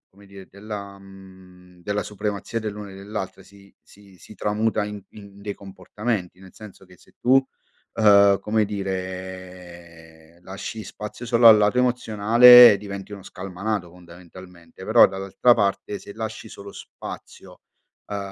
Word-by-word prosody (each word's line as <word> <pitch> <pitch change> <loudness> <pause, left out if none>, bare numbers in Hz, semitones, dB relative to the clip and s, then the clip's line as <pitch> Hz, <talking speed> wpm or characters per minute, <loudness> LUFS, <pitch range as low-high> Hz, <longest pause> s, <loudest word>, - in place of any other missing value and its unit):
come 100 +1 -20
dire, 95 -1 -14
della 100 -1 -9
mhmm, 95 -2 -17
della 105 +2 -3
supremazia 105 +2 -5
dell'uno 105 -1 -7
e 95 - -12
dell'altra 95 -1 -7
si 100 0 -20
si 100 -2 -20
si 110 - -15
tramuta 105 +1 -1
in 105 -1 -8
in 100 -1 -14
dei 100 0 -6
comportamenti. 95 0 -6
Nel 95 -1 -15
senso 105 -3 -14
che 90 -1 -20
se - - -24
tu, 130 +2 +3 0.5
uhm, 100 -2 +5
come 110 0 0
dire, 90 -4 -8
lasci 100 +3 -8
spazio 105 +5 -9
solo 115 -1 +5
al 110 - +9
lato 105 +4 +1
emozionale 120 -1 +7
diventi 100 0 -9
uno 100 -2 -9
scalmanato, 95 0 -5
fondamentalmente, 90 0 -15
però - - +6
dall'altra 95 +5 +1
parte 100 0 -2
se 100 - -12
lasci 110 0 -7
solo 100 -1 -11
spazio, - - -12 0.5
uhm, 100 - -3
100 Hz, 140 wpm, -22 LUFS, 95-105 Hz, 0.5 s, al